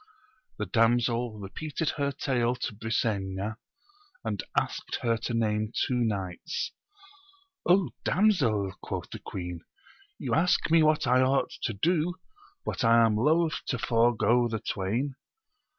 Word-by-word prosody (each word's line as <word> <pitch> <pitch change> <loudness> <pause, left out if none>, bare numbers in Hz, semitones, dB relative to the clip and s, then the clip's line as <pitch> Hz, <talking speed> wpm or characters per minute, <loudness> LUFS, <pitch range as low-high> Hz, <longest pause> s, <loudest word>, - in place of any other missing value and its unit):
The 105 - -2
damsel 115 +2 +2
repeated 150 - -3
her 140 -1 -1
tale 125 -3 0
to 125 - -4
Brisena, 105 -1 -2 0.7
and - - -2 0.2
asked - - -1
her 115 -1 +2
to 120 +1 -3
name 110 -1 0
two - - -2
knights. 100 -7 -2 1.3
damsel? 120 - +2
quoth - - -5
the - - -6
Queen, 90 -2 -6 0.6
you - - -3
ask 165 0 +2
me 165 0 +6
what 155 -1 +3
I 125 +1 +4
ought 135 +1 +2
to 110 - -1
do, 170 - +1 0.5
but - - -2
I 115 0 +6
am 110 -2 +2
loth 155 +8 +2
to 125 - 0
forego 120 0 +3
the 110 -1 -2
twain. 110 +10 -2
115 Hz, 130 wpm, -28 LUFS, 105-140 Hz, 1.3 s, me